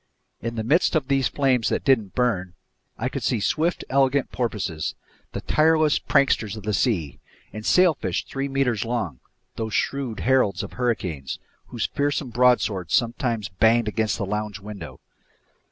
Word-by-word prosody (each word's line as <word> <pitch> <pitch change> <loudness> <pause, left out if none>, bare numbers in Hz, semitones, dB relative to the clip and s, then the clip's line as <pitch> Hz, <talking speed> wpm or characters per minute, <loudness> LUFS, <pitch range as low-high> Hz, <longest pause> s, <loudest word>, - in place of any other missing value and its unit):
In 115 0 -4
the 110 - -2
midst 150 +9 +2
of 140 -4 0
these 135 -2 +3
flames 130 -5 +1
that - - -1
didn't 115 -8 +2
burn, 95 -8 0 0.4
I - - -1
could - - -4
see 120 - 0
swift, 160 - 0
elegant 135 0 +2
porpoises, 100 -10 -2 0.4
the - - -4
tireless 155 -1 +3
pranksters 110 -6 +1
of 105 - -8
the 105 +1 -1
seas, 95 - 0 0.4
and 110 - -6
sailfish 180 +3 +2
three 135 0 -3
meters 135 -6 0
long, 110 - -3 0.4
those 110 -3 -3
shrewd 135 -5 -1
heralds 125 -8 +2
of - - -8
hurricanes, 90 - -2 0.3
whose 120 -3 -3
fearsome 145 -2 -1
broadswords 110 -8 +2
sometimes 115 -3 0
banged 110 +5 +3
against 110 -1 0
the 100 - -2
lounge 105 +1 -3
window. 105 0 -9
115 Hz, 155 wpm, -24 LUFS, 105-135 Hz, 0.4 s, these